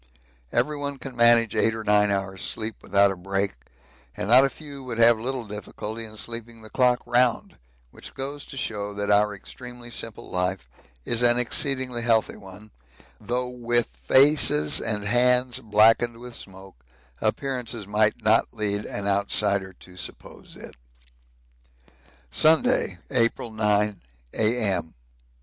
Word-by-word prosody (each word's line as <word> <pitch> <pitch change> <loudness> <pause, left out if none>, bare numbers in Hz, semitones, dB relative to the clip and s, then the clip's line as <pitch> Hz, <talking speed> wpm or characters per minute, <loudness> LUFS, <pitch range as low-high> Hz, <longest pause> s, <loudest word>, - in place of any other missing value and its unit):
Everyone 145 -2 -1
can 135 -1 -8
manage 120 -2 +5
eight 110 +1 +2
or 110 - -6
nine 105 -1 +3
hours' 95 -1 -2
sleep 110 0 -4
without 100 0 +3
a - - -4
break, 95 +2 -2 0.6
and 100 - -3
not 125 +3 +7
a 135 - +2
few 140 -2 -10
would 120 -3 -6
have 115 -1 +5
little 125 +1 -4
difficulty 105 +2 -7
in 110 0 -12
sleeping 115 0 -5
the 110 - -11
clock 125 -1 +2
round, 120 -1 +1 0.3
which - - -11
goes 140 +2 -5
to 135 - -11
show 105 -4 -4
that 100 0 -1
our 105 0 +3
extremely 120 +3 -11
simple 115 -1 -6
life 90 -6 -2 0.4
is 120 0 +1
an 120 0 +4
exceedingly 125 0 0
healthy 115 -1 +1
one, 100 +2 -13 0.5
though 125 +1 -2
with 120 -1 0 0.2
faces 130 - +4
and 105 -2 -1
hands 125 +3 +2
blackened 115 +1 +3
with 120 +1 -10
smoke, 95 -9 -12 0.4
appearances 120 -1 -2
might 105 +3 +1
not 110 +1 +3
lead 105 -1 -2
an 100 0 -5
outsider 100 -1 +1
to 90 0 -16
suppose 90 - -9
it. - - -12 1.5
Sunday, 155 - +3
April 115 -2 +1
9, 105 -1 0 0.3
A.M. 105 -7 0
115 Hz, 140 wpm, -24 LUFS, 100-125 Hz, 1.5 s, not